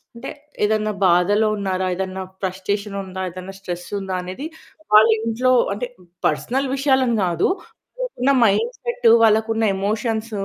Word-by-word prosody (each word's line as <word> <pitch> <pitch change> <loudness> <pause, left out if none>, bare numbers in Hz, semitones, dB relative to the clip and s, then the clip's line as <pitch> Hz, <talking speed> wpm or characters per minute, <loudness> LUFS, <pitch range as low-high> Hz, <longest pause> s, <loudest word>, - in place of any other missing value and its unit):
అంటే 235 - -7 0.3
ఏదన్నా 215 0 +1
బాధలో 190 +5 +3
ఉన్నారా? 190 -2 -1
ఏదన్నా 190 0 -4 0.2
ఫ్రస్టేషన్ 200 +2 -3
ఉందా? 190 0 -7
ఏదన్నా 185 +2 -9
స్ట్రెస్ 175 -2 -6
ఉందా? 190 -1 -4
అనేది 185 +11 -7 0.5
వాళ్ళ 215 +1 +8 0.2
ఇంట్లో 245 +3 +1 0.2
అంటే 245 +4 -4 0.4
పర్సనల్ 245 - 0
విషయాలను 265 -4 +2
కాదు. 170 -1 +1 0.5
వాళ్ళకున్న 275 - 0
మైండ్ 460 - +1
సెట్ 475 - 0 0.2
వాళ్ళకున్న 220 +1 +3
ఎమోషన్స్ 220 +3 -2
210 Hz, 125 wpm, -21 LUFS, 190-230 Hz, 0.5 s, వాళ్ళ